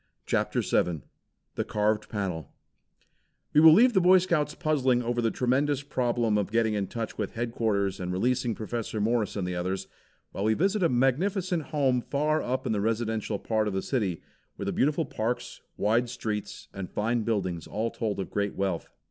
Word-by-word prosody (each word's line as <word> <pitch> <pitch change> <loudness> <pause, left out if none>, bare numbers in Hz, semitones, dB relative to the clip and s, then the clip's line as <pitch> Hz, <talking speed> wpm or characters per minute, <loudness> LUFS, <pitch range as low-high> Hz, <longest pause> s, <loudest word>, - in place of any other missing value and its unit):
CHAPTER - - 0
VII 85 -4 0 0.5
THE - - -1
CARVED 105 0 0
PANEL 95 - -3 1.0
We 150 - +6
will 160 0 +10
leave 240 +9 +6
the 190 - +4
Boy 185 +2 +7
Scouts 170 -5 0
puzzling 130 -6 +1
over 120 +1 0
the 115 - +2
tremendous 135 +4 +1
problem 120 -5 +1
of 100 - -2
getting 115 -1 +2
in 100 -2 -1
touch 115 +1 -5
with 105 - -2
headquarters 110 -4 -1
and 90 -1 -3
releasing 120 +4 0
Professor 110 0 -4
Morris 110 0 0
and 95 -3 -2
the 90 - -2
others, 95 +2 -2 0.4
while 100 - -3
we 110 0 +3
visit 195 - +1
a 170 - +4
magnificent 170 - +1
home 135 -4 +1
far 150 +4 0
up 130 +2 -2
in - - 0
the 105 -2 0
residential 110 -1 -1
part 110 +1 0
of 100 - -2
the 95 - -1
city, 100 - -1 0.3
where - - -5
the - - -1
beautiful 150 +4 +1
parks, 120 -1 -3 0.2
wide 115 +4 +2
streets 110 -4 -4
and 95 -2 -6
fine 115 +3 0
buildings 95 -7 -2
all 110 +2 -2
told 110 -4 -3
of 95 - -4
great 100 -1 -1
wealth. 95 -4 -2
115 Hz, 180 wpm, -28 LUFS, 105-130 Hz, 1.0 s, will